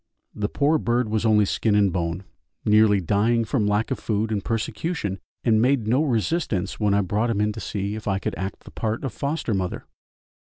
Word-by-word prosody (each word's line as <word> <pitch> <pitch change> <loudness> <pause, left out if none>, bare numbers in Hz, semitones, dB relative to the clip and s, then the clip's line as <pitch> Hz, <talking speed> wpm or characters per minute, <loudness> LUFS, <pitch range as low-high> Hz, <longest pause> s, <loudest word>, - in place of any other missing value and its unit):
The 105 0 -2
poor 150 +2 +2
bird 120 -2 0
was 110 +1 +1
only 105 -1 +4
skin 105 +2 +1
and 100 -3 +3
bone, 85 +1 -2 0.4
nearly 105 -1 +5
dying 110 +6 +1
from 110 -2 0
lack 105 +2 0
of - - -1
food 110 0 -1
and 100 -3 -1
persecution, 115 - -2 0.2
and 110 -2 +3
made 125 -3 +2
no 125 +6 +3
resistance 115 - -1
when 105 -2 +2
I 100 - +3
brought 105 +5 0
him 110 -3 0
in 105 0 +2
to 110 - -7
see 100 -1 -3
if 110 0 -7
I 95 -1 +1
could - - -3
act 95 0 -5
the - - -12
part 110 +3 -3
of 135 -6 -3
foster 140 -4 -2
mother. 95 -2 -2
110 Hz, 205 wpm, -24 LUFS, 100-115 Hz, 0.4 s, nearly